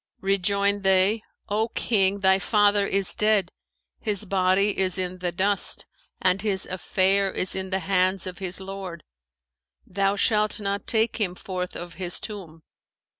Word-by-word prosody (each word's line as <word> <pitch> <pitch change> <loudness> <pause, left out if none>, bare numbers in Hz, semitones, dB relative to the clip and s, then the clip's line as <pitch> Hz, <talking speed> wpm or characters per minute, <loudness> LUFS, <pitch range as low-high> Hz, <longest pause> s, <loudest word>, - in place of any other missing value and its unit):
Rejoined 200 +1 +1
they, 195 +3 +3 0.3
'O 215 +2 0
King, 200 -3 +1
thy 190 0 +4
father 205 -1 +3
is 195 -1 -1
dead; 210 -4 +2 0.5
his 210 -2 -2
body 195 +1 +2
is 185 -1 +1
in 185 0 -3
the 180 -1 -1
dust 195 +4 0 0.3
and 185 +1 +2
his 195 -3 +1
affair 195 +1 +1
is 185 - -2
in 190 0 -3
the 190 - 0
hands 185 -1 +1
of 185 0 -6
his 185 -1 -3
Lord; 190 -3 -7 0.8
thou 195 +1 0
shalt 215 0 +1
not 200 -1 -3
take 225 -1 +1
him 190 -5 -1
forth 180 -1 -5
of 175 -1 -7
his 175 -1 +1
tomb.' 170 -7 -8
195 Hz, 150 wpm, -25 LUFS, 185-205 Hz, 0.8 s, thy